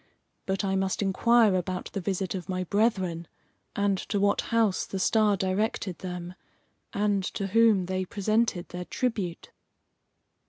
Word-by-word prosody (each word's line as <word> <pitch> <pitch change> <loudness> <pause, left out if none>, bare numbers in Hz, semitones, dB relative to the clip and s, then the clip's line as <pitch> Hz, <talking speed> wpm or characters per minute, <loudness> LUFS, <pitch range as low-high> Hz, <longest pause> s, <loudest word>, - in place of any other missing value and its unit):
But 195 +1 -1
I 195 0 0
must 190 +1 0
inquire 220 +2 +4
about 185 0 -3
the 195 - -2
visit 190 0 -2
of 185 -2 -6
my 185 0 -1
brethren, 185 -4 0 0.5
and 200 -1 +1
to 205 - 0
what 200 0 +2
house 225 -5 +2
the 195 - -4
star 210 +1 +3
directed 190 -1 -1
them, 180 -1 -6 0.6
and 205 -1 +1
to 200 - -2
whom 210 -2 +4
they 185 +1 -2
presented 215 -1 0
their 180 0 -6
tribute." 205 -9 -3
195 Hz, 145 wpm, -27 LUFS, 185-210 Hz, 0.6 s, inquire